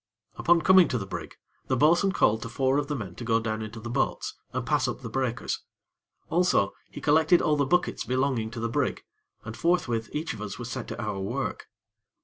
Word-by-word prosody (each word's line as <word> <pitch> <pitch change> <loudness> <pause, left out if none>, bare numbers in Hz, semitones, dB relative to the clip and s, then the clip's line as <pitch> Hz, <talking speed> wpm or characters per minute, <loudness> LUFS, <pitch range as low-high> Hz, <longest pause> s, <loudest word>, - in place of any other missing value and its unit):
Upon 170 0 +4
coming 185 -2 +7
to 125 - -1
the 100 - -4
brig, 95 - -7 0.3
the 130 - +1
bo'sun 170 +8 +4
called 110 - +2
to 115 - -5
four 135 +2 +1
of 145 - -3
the 145 - -2
men 100 -9 -5
to - - -6
go 115 -1 +2
down 110 -1 -3
into 110 +1 -6
the 115 - -7
boats, 135 +2 -1 0.2
and 125 0 -3
pass 145 -3 +2
up 120 +2 -4
the 115 -3 -7
breakers: 130 -1 -2 0.7
also, 175 - +2 0.2
he - - -9
collected 155 +4 +4
all 155 -2 +2
the 140 -2 +1
buckets 175 +4 +1
belonging 130 -3 0
to 115 - -7
the 115 - -1
brig, 115 - -1 0.4
and 110 +1 -6
forthwith 120 -11 0
each 155 +2 -3
of 110 - -9
us 100 -2 -5
was 120 -1 -6
set 130 -3 -4
to - - -6
our 105 -3 -3
work. 95 - -3
130 Hz, 215 wpm, -27 LUFS, 115-150 Hz, 0.7 s, coming